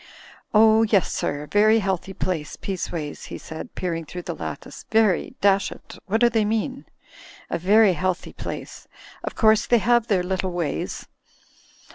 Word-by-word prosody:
"Oh, 220 +1 +6
yes, 210 -5 +2
sir; 145 +1 -2
very 215 +2 +5
healthy 195 -2 -2
place, 160 -6 -3
Peaceways/' 170 -6 -5
he - - -6
said, 160 - -9
peering 170 -2 -3
through 175 +3 -8
the - - -4
lattice. - - -7
"Very... 220 -5 +2
dash 195 -1 +3
it, - - -12
what 220 +4 0
do 240 - +7
they 230 -2 +1
mean?... 225 +6 -2 0.7
Very 195 +4 +4
healthy 185 +2 -2
place. - - -7 0.4
Of - - -5
course 220 -1 +4
they 240 - +5
have 235 +2 +2
their 190 -4 +2
little 190 0 -2
ways." 170 -5 -3
195 Hz, 150 wpm, -23 LUFS, 180-220 Hz, 0.7 s, do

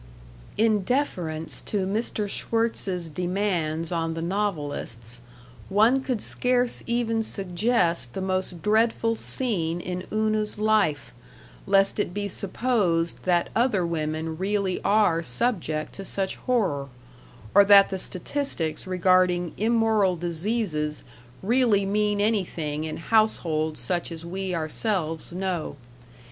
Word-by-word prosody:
In 220 -1 +3
deference 180 - -2
to 200 -3 -2
Mr. 210 +1 -1
Schwirtz's 200 -5 -1
demands 175 -2 -1
on 165 -1 -1
the 165 - -4
novelists, 145 - -3 0.5
one 225 +7 +4
could 255 -5 -2
scarce 250 -1 0
even 235 -1 0
suggest 180 - 0
the - - -4
most 185 -2 -2
dreadful 225 +1 +2
scene 180 -10 -2
in 180 +1 -5
Una's 215 -1 0
life, 210 -8 +1 0.5
lest 195 +1 +3
it 180 -3 -1
be 205 0 -2
supposed 195 -5 0
that 175 -2 +2
other 225 -7 +2
women 160 0 -3
really 195 -1 0
are 200 -5 +3
subject 160 - -1
to 195 - -7
such 195 0 -2
horror, 190 - 0 0.7
or 200 - +8
that 200 0 +7
the 190 - -3
statistics 185 - -3
regarding 180 -1 +2
immoral 220 -3 +2
diseases 170 -2 -2 0.4
really 225 -2 +3
mean 205 +1 +1
anything 170 -8 -1
in 155 - -4
households 165 -7 +1
such 175 -1 -2
as 165 0 -7
we 185 +1 -3
ourselves 165 0 -2
know.... 180 -4 -3
190 Hz, 115 wpm, -25 LUFS, 165-215 Hz, 0.7 s, or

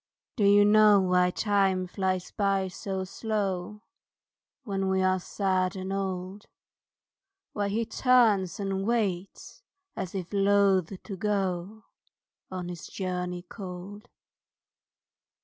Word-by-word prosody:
DO 210 - +1
you 205 +1 +6
know 210 -1 +6
why 180 -1 +3
Time 195 -2 +1
flies 185 0 -2
by 195 -2 0
so 190 +1 -4
slow 205 0 -3 0.8
When 195 -4 -2
we 190 0 +1
are 185 0 +2
sad 185 0 -1
and 190 0 -4
old? 190 +1 -4 1.1
Why 205 -1 -1
he 225 +3 -1
turns 220 -9 +3
and 195 -1 -2
waits 200 -6 -2 0.3
as 185 +1 -5
if 185 0 -5
loath 195 -2 +2
to 195 - -6
go 195 +1 -2 0.7
On 185 -1 -5
his 175 -3 -7
journey 180 -2 -4
cold? 190 +1 -9
195 Hz, 115 wpm, -28 LUFS, 185-205 Hz, 1.1 s, you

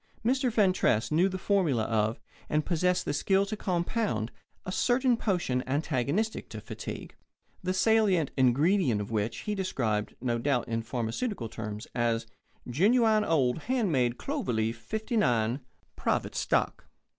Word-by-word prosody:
Mr. 260 +1 +2
Fentress 185 - +2
knew 175 +5 +3
the 190 - -4
formula 175 - +1
of, 110 0 0 0.3
and 150 0 +1
possessed 180 +1 +1
the 145 - -1
skill 195 +6 +2
to 210 +2 -4
compound, 185 - -1 0.3
a 185 - -3
certain 245 +4 +2
potion 175 - 0
antagonistic 150 - -1
to - - -7
fatigue, - - -7 0.5
the 185 - -1
salient 190 - +3
ingredient 135 - +3
of 105 +2 -5
which 110 0 -1
he 210 - -2
described 120 - -1
(no 120 -1 -1
doubt 130 -1 0
in 115 0 -1
pharmaceutical 120 - -3
terms) 110 -1 -6
as 115 -1 0 0.4
"genuine 215 - +3
old 140 -7 +2
hand 240 -8 +1
made 125 -4 +1
Clover 125 - -2
Leaf 110 +1 0
'59, 125 - 0 0.4
Private - - -1
Stock." - - 0
155 Hz, 140 wpm, -29 LUFS, -, 0.5 s, knew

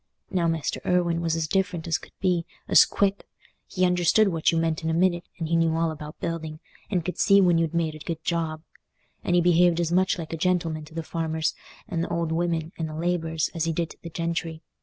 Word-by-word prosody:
Now 175 -2 +1
Mester 165 -3 -1
Irwine 170 -2 +1
was 165 -1 0
as 160 -1 -1
different 180 -2 -1
as 160 -5 +1
could - - -15
be: 180 -3 +1 0.2
as - - +7
quick!—he 195 -1 -2
understood 180 +4 +3
what 165 -3 +2
you 165 - 0
meant 165 -1 0
in 160 - 0
a 160 - +1
minute, 175 0 +2
and 165 - -3
he 165 - +1
knew 165 -1 +2
all 165 0 +1
about 150 -1 -9
building, 160 -2 -4 0.3
and 180 -5 -1
could 180 - -4
see 200 -2 +6
when 175 -3 +4
you'd 165 0 -1
made 165 -2 0
a 155 - -10
good 165 +1 -5
job. 160 -2 -2 0.6
And 175 - +1
he 175 - +5
behaved 175 0 +4
as 170 -1 0
much 185 +2 +2
like 165 -1 -6
a - - -2
gentleman 165 -3 0
to 160 +1 -15
the 165 - -3
farmers, 160 -1 -1 0.3
and 165 -1 -2
th' - - -4
old 170 -1 -1
women, 165 -1 -1
and 160 -1 -2
the 155 - -7
labourers, 165 -1 -1
as 165 -1 -1
he 165 - 0
did 165 0 -2
to - - -15
the 170 - -7
gentry. 165 -1 -3
165 Hz, 230 wpm, -25 LUFS, 160-175 Hz, 0.6 s, as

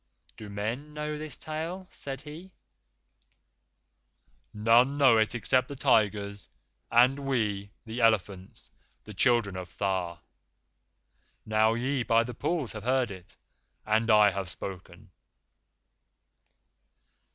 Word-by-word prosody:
"Do 105 - -10
men 115 +9 -5
know 150 0 -3
this 155 0 -6
tale?" 165 +4 -5
said 135 -1 -5
he. 160 +5 -10 2.0
"None 115 +6 +3
know 130 -6 +5
it 110 +2 +1
except 130 +1 +1
the 140 - -7
tigers, 100 -5 +1 0.4
and 125 +4 +4
we, 110 -8 -1 0.2
the 115 +2 -5
elephants 100 -4 0 0.3
the 105 - -10
children 115 -3 +2
of 90 -2 -8
Tha. 95 -4 -1 1.3
Now 110 +1 +2
ye 130 +3 -1
by 115 -1 +3
the 125 +1 -7
pools 150 +1 -2
have 110 - -7
heard 125 -2 +1
it, 90 -2 -12 0.5
and 110 +2 +1
I 105 -2 +6
have 95 -3 -4
spoken." 90 +1 -8
115 Hz, 115 wpm, -28 LUFS, 100-135 Hz, 2.0 s, I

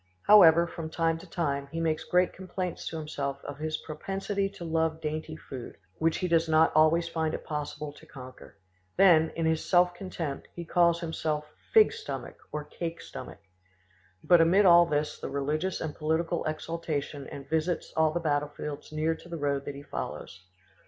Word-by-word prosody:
However, 170 -5 +8
from 165 -2 -6
time 165 0 0
to 185 - -13
time, 140 -5 -2
he 165 - -3
makes 160 -1 -1
great 180 0 +2
complaints 185 -1 -5
to 165 - -4
himself 145 -3 -3
of 145 0 -7
his 155 0 -2
propensity 195 +5 -2
to 195 -3 -9
love 160 -1 0
dainty 155 0 -4
food, 130 -6 -9 0.2
which 160 0 +2
he 180 - -1
does 165 -1 +2
not 160 +1 +5
always 155 +2 +4
find 160 -1 -1
it - - -8
possible 150 -1 -4
to - - -16
conquer. 130 -1 -12 0.4
Then, 160 -5 +6
in 165 - -1
his 160 0 +1
self 180 -1 +4
contempt, 175 -6 -5
he 170 - -6
calls 170 0 +3
himself 155 -2 -2 0.3
"fig 440 0 +6
stomach" 460 -1 -6
or 150 0 -3
"cake 165 +2 -6
stomach." - - -9 0.8
But 175 -2 +6
amid 185 +5 +5
all 175 -1 +7
this 150 -1 -1
the - - -5
religious 150 +6 -1
and 155 -2 -4
political 160 +2 -1
exaltation 155 -2 -3
and 140 -1 -9
visits 160 +3 -1
all 160 -1 +3
the 175 - -1
battlefields 145 -1 -3
near 155 +1 0
to 175 - -13
the 170 - -4
road 140 -2 -1
that 140 - -5
he 140 - -9
follows. 90 - -6
160 Hz, 180 wpm, -28 LUFS, 150-170 Hz, 0.8 s, However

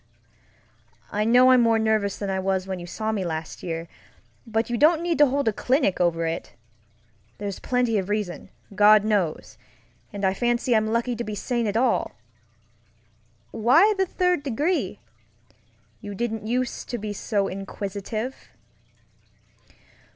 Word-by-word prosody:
I 210 +1 0
know 250 +3 +6
I'm 255 -1 +6
more 230 -1 +3
nervous 220 -3 +1
than 200 -1 -3
I 190 - -1
was 190 0 -1
when 190 -1 -4
you 175 - -8
saw 220 +4 -3
me 205 -3 -2
last 160 -2 -5
year, 165 -1 -4 0.6
but 225 +1 0
you 240 - -2
don't 315 +6 +4
need 340 -2 -1
to 295 - +7
hold 275 -1 -1
a 220 - +3
clinic 250 -6 +1
over 165 -1 +1
it. 165 -5 -4 0.8
There's 200 -2 -5
plenty 245 -4 +1
of 190 0 -5
reason, 205 -4 -3 0.2
God 210 +1 +6
knows, 200 -7 -1 0.5
and 200 -1 -3
I 190 - +2
fancy 240 +2 +1
I'm 215 0 +2
lucky 235 +1 0
to 235 - -4
be 210 -2 -5
sane 235 +2 -1
at 205 +1 -1
all. 245 0 +1 1.4
Why 315 - +4
the 385 -1 0
third 360 -3 +1
degree? 290 +7 -1 1.0
You 205 -2 -7
didn't 225 -1 -3
use 250 +1 -1
to 240 - -4
be 210 -1 -5
so 200 -1 -1
inquisitive. 200 +5 -5
220 Hz, 150 wpm, -24 LUFS, 195-245 Hz, 1.4 s, to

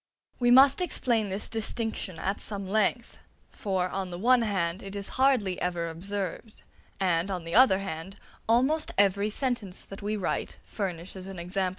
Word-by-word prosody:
We 245 -1 +3
must 270 +6 +7
explain 235 - 0
this 195 +2 -1
distinction 225 -5 -2
at 195 +2 -2
some 200 -2 -5
length; 215 +4 0 0.3
for, 190 -3 -1
on 190 -1 -3
the 175 - -6
one 245 +5 +4
hand, 190 -4 -1
it 195 0 -8
is 200 -1 -4
hardly 250 -9 +2
ever 175 -2 -1
observed, 195 +5 -5 0.4
and, 180 -1 +1
on 185 -3 -3
the 165 0 -6
other 245 -6 +6
hand, 190 -1 -6 0.3
almost 265 +7 +2
every 200 +1 +3
sentence 220 -5 -3
that 195 - -10
we 210 +1 -2
write 190 - -2
furnishes 185 -1 -5
an 195 -1 -8
example 180 +3 -3
of 190 - +2
it. - - 0
195 Hz, 175 wpm, -28 LUFS, 185-225 Hz, 0.4 s, must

